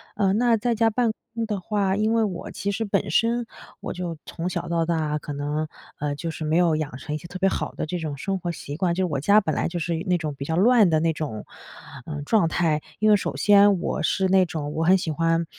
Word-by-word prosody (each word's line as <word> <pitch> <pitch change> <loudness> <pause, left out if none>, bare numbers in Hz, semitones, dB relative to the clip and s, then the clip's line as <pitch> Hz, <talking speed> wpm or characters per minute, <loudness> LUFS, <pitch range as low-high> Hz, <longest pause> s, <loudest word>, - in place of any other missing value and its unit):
嗯， 195 -2 +2
那 240 -2 +4
在 235 +3 0
家 225 0 +3
办 235 +1 +1 0.2
公 230 -1 -1
的 210 -3 -3
话， 195 0 0
因 215 +2 +1
为 230 -1 +3
我 180 -5 -4
其 200 - -3
实 225 - -2
本 195 -7 -1
身， 230 +6 +2 0.3
我 - - -5
就 175 -2 -5
从 170 +2 -4
小 - - -4
到 165 -1 0
大 155 -3 0
可 145 - -6
能， 145 +2 -2 0.3
嗯， 145 0 -2
就 165 +3 -4
是 160 - -6
没 155 +2 +2
有 175 -3 +3
养 150 -4 -3
成 150 +2 -6
一 - - -1
些 170 - -11
特 175 +2 -7
别 195 - +2
好 - - -2
的 - - -3
这 175 +3 -3
种 155 -3 -4
生 195 +7 -2
活 175 -1 -3
习 145 -3 -7
惯。 170 +1 0
就 190 - 0
是 - - +2
我 140 - 0
家 200 +9 +5
本 160 -7 -2
来 - - 0
就 175 - -4
是 170 0 -2
那 180 -1 +3
种 155 -3 -4
比 140 - -6
较 160 - -1
乱 215 +2 +5
的 160 -1 +3
那 165 +1 +1
种， 145 -9 -5 0.6
嗯， 145 -2 -5
状 205 -1 +3
态。 160 -3 +1 0.2
因 215 - +3
为 210 - +7
首 200 - -2
先 200 -2 +5
我 - - -2
是 190 +4 +1
那 190 -1 +5
种 155 -3 -4
我 160 +1 -1
很 185 +3 +5
喜 175 - -3
欢 165 +1 +1
175 Hz, 280 characters per minute, -24 LUFS, 155-200 Hz, 0.6 s, 为